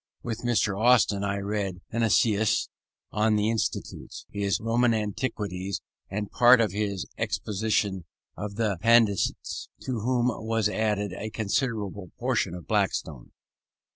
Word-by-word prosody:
With 115 -1 -3
Mr. 110 -4 0
Austin 115 -5 +4
I 100 0 -1
read 100 -2 -2
Heineccius 110 -2 +2 0.4
on 110 +1 +2
the 105 +1 +2
Institutes, 115 -3 -4
his 100 -1 0
Roman 115 +1 +2
Antiquities, 100 -4 -3 0.3
and 105 +1 -4
part 125 0 +7
of 110 -5 +2
his 100 -2 -2
exposition 100 -3 -1 0.3
of 100 +1 -5
the 105 -5 0
Pandects; 115 -3 +2
to - - -4
which 125 +1 +1
was 115 -2 +2
added 105 -2 -1
a 110 +3 -5
considerable 105 -4 -2
portion 120 -8 0
of 90 - -9
Blackstone. 95 - -1
105 Hz, 125 wpm, -27 LUFS, 100-115 Hz, 0.4 s, part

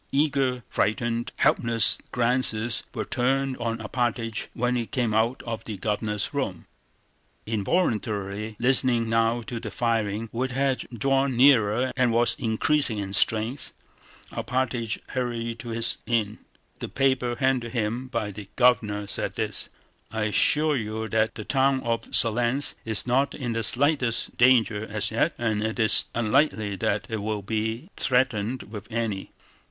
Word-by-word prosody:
Eager, 135 -3 +1
frightened, 115 +2 -1
helpless 115 -1 +2
glances 120 -2 +1
were - - -4
turned 135 +1 0
on 115 -1 -2
Alpátych 115 0 -2
when 125 +1 0
he 120 -2 -1
came 120 -6 -1
out 115 +4 +1
of 115 -1 -5
the 110 -3 -5
Governor's 105 0 -2
room. - - -3 0.8
Involuntarily 105 - -1
listening 125 -2 +2
now 115 +1 +1
to 115 0 -5
the 115 -2 -6
firing, 115 -1 -1
which 130 +2 -2
had 135 0 0
drawn 135 +2 +1
nearer 125 -2 +4
and 125 -2 +2
was 120 +1 +3
increasing 120 +1 +1
in 100 -1 -4
strength, 110 +6 +1 0.6
Alpátych 120 -3 -2
hurried 115 -2 -3
to 120 - -7
his 115 0 0
inn. 110 -3 0 0.4
The - - -5
paper 130 -3 +1
handed 130 -3 +1
to 125 - -4
him 115 +4 -1
by 115 -5 -3
the 100 0 -10
Governor 105 -5 +2
said 100 - -2
this: - - -1 0.4
"I 110 -1 -2
assure 150 +8 +3
you 110 -1 -4
that 110 0 +1
the 110 - -7
town 135 0 +2
of 115 -1 -2
Smolénsk 120 +4 +2
is 110 -2 -1
not 130 +3 +1
in 125 -4 -3
the 115 - -1
slightest 130 0 +2
danger 120 -4 +4
as 105 -1 0
yet 115 +9 +1
and 110 -3 0
it 110 0 -2
is 110 -3 +3
unlikely 110 -3 +1
that 100 +3 -1
it 110 - -3
will 105 -1 -3
be 110 - -3
threatened 125 -3 +1
with 105 -1 -9
any. 110 -4 -2
115 Hz, 145 wpm, -25 LUFS, 110-125 Hz, 0.8 s, nearer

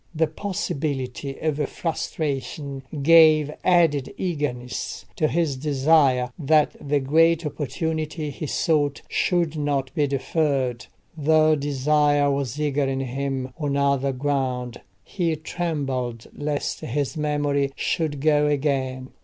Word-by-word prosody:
The 160 +1 +3
possibility 140 -6 -3
of 155 -2 -1
frustration 145 -4 -3 0.2
gave 155 -2 +6
added 165 -7 +3
eagerness 145 -8 -3
to 155 - +2
his 160 -3 0
desire 135 -2 +3
that 155 0 +3
the 145 0 +1
great 165 +4 +3
opportunity 155 +1 -3
he 150 +3 -5
sought 145 -2 0
should 170 -3 0
not 145 -3 -1
be 150 -3 +1
deferred. 135 -3 -1 0.3
The 155 0 +4
desire 145 0 +2
was 140 -1 -2
eager 145 -2 +1
in 135 0 -1
him 135 0 -3
on 145 -2 -1
another 140 -1 +2
ground; 130 -3 -2 0.2
he 170 -4 -1
trembled 140 -8 -3
lest 145 0 -2
his 140 +5 -2
memory 145 -2 0
should 150 -5 -1
go 150 -1 +3
again. 135 -3 -1
145 Hz, 115 wpm, -24 LUFS, 135-155 Hz, 0.3 s, gave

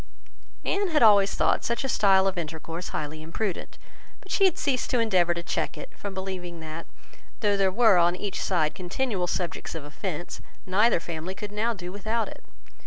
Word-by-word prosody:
Anne 400 0 +1
had 310 -7 +3
always 200 -3 +6
thought - - +2
such 235 +2 -1
a - - -1
style 195 -6 +4
of 195 -1 +1
intercourse 165 +1 -5
highly 155 +1 -4
imprudent; 175 +5 -4 0.4
but - - -13
she 390 - +4
had 375 - +3
ceased 265 -4 0
to 250 - +2
endeavour 185 -6 +3
to 170 - -4
check - - -2
it, - - -9
from 200 - -6
believing 185 -3 -5
that, 160 +1 -7 0.5
though 205 -2 +3
there 195 -1 +2
were 215 -3 +5
on 175 +1 +4
each 200 +1 -3
side 160 -5 +1
continual 185 +1 -2
subjects 175 -2 -3
of 160 - -5
offence, 175 +2 -5 0.2
neither 205 +2 +3
family 170 +2 -5
could 205 0 -6
now 215 +3 0
do 180 -2 -7
without 215 +3 -1
it. - - -11
190 Hz, 185 wpm, -27 LUFS, 170-215 Hz, 0.5 s, always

